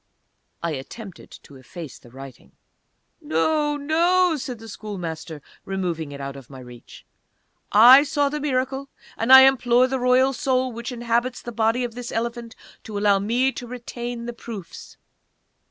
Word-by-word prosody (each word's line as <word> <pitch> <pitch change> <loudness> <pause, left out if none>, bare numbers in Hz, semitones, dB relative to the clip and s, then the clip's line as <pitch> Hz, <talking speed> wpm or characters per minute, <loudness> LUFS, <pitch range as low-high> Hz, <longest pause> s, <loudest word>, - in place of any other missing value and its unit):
I 170 - -1
attempted 175 - -9
to 140 - -15
efface 150 +3 -10
the 120 - -17
writing. 135 0 -13 0.7
"No, 295 - 0
no," 340 +4 +2
said 250 -4 -6
the 225 0 -12
Schoolmaster, 165 -8 -7 0.2
removing 175 -6 -3
it 140 - -8
out 140 0 -6
of 135 -3 -12
my 135 - -11
reach. 125 -2 -13 0.7
"I 245 +6 +9
saw 290 -1 0
the 300 +2 -3
Miracle, 270 -1 -2 0.3
and 225 +3 -1
I 265 0 +11
implore 255 -2 +4
the 265 0 -2
Royal 255 +2 +3
Soul 255 0 0
which 235 +2 -6
inhabits 240 +1 -2
the 240 - -6
body 225 +2 +1
of 240 -2 -4
this 245 0 -7
Elephant 235 0 -4 0.3
to 210 -2 -6
allow 200 -1 +3
me 240 +6 +1
to 245 -2 -8
retain 240 -1 -6
the 240 - -5
proofs!" 220 -6 -10
235 Hz, 155 wpm, -23 LUFS, 180-260 Hz, 0.7 s, I